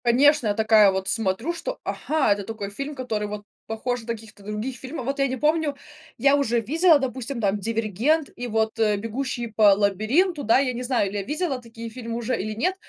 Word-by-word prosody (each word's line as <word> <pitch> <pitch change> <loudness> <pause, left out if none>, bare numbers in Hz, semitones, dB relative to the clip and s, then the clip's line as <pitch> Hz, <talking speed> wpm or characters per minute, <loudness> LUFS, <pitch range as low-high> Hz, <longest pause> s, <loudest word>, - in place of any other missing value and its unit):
Конечно, 265 +2 +4
я 205 - +2
такая 220 -2 +5
вот 190 0 -3
смотрю, 225 - -1
что, - - -5
ага, 300 -8 +1
это 200 0 -5
такой 210 -1 -5
фильм, 275 +7 -5
который 225 -5 -3
вот 205 0 -6 0.2
похож 245 +2 -2
на 225 - -15
каких-то 220 -3 -7
других 210 +5 -4
фильмов. 260 +1 -7
Вот 275 +2 -2
я 275 - +3
не 260 0 -3
помню, 305 +1 +1 0.4
я 275 +4 +4
уже 240 -5 +1
видела, 315 - +4
допустим, 260 0 -4
там 205 -2 +1
"Дивергент" 230 - 0
и 245 - -5
вот, 220 -1 0
э, 210 -2 +3
"Бегущий 240 +3 -3
по 210 -2 +5
лабиринту". 230 - +1
Да, 230 +4 +4
я 265 -2 0
не 245 - -5
знаю, 245 -5 +1
или 205 - -4
я 200 - -2
видела 295 - -2
такие 230 -1 -9
фильмы 230 0 -6
уже 240 +2 -1
или 215 +2 -4
нет, 355 - 0
235 Hz, 210 wpm, -24 LUFS, 215-275 Hz, 0.4 s, такая